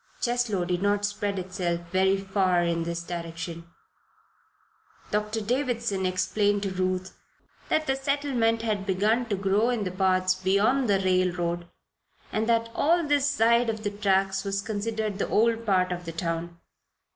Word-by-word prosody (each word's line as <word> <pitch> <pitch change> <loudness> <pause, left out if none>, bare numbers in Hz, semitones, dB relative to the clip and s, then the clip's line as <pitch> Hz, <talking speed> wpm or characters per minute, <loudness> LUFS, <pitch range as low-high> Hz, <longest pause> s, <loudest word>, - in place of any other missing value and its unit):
Cheslow 240 -7 0
did 175 0 -1
not 205 0 +1
spread 205 -1 -2
itself 180 -2 -2
very 190 +1 +3
far 190 -2 +1
in 170 -1 0
this 170 0 -3
direction. 170 -1 -6 1.5
Doctor 210 +1 -1
Davison 235 -5 -1
explained 205 +2 +1
to 195 - -2
Ruth 185 0 -2 0.5
that 310 - +1
the 270 - +1
settlement 270 -5 0
had 210 -3 -2
begun 215 +6 +1
to 210 - 0
grow 200 +4 +1
in 240 -4 0
the 185 - -3
parts 185 0 +2
beyond 200 +7 +2
the 200 - +4
railroad 180 -2 0 0.6
and 220 +2 -1
that 230 0 +2
all 335 +3 +2
this 290 -1 +2
side 235 -1 +3
of 220 -1 -3
the 205 - -1
tracks 195 -2 +1
was 200 0 -2
considered 215 -1 -3
the - - -1
old 230 +1 +2
part 185 -2 +2
of 180 0 -4
the 165 - -4
town. 165 0 -3
200 Hz, 155 wpm, -26 LUFS, 185-225 Hz, 1.5 s, the